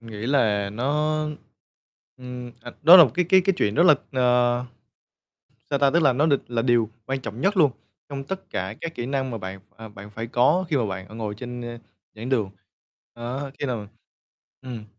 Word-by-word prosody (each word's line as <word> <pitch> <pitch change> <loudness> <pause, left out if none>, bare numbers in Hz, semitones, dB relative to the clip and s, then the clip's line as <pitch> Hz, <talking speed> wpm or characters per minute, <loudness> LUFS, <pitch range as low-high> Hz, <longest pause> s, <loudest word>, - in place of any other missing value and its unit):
Nghĩ 115 -1 -7
là 105 -7 +2
nó 150 +7 0 1.0
ừm, 125 -1 -8
à, 120 - -9
đó 170 +5 +10
là 170 - +10
một 130 - -2
cái 180 - +2
cái 190 - +6
cái 195 +2 +2
chuyện 105 - +1
rất 165 - +4
là 175 -4 +7 0.2
ờ, 125 -1 +2 1.1
sao 140 - +1
ta, 140 0 +4
tức 170 +4 +3
là 140 -4 +5
nó 145 +5 +2
đ 155 - +2 0.2
là 120 -1 -1
điều 120 -3 +2 0.2
quan 135 0 -2
trọng 115 -1 -7
nhất 195 +6 +1
luôn, 150 -6 +5 0.4
trong 135 -1 -6
tất 190 +6 -6
cả 95 +3 -3
các 165 0 -5
kỹ 120 -4 -4
năng 135 -1 -2
mà 115 - -4
bạn 95 0 -7
ph 105 - -35
à, 110 0 -10
bạn 105 0 -12
phải 115 +2 -6
có 125 +10 +2
khi 155 - +1
mà 120 -5 +1
bạn, 95 -1 -6
ờ, 110 - -12
ngồi 110 -2 -4
trên, 120 +2 -7
ơ, 120 0 -7 0.4
giảng 110 +3 -7
đường. 115 -7 0 0.6
Đó, 125 +4 -5
khi 145 - -2
nào 115 -5 -3 0.8
ừm, 120 -4 -7
125 Hz, 210 wpm, -24 LUFS, 110-140 Hz, 1.1 s, đó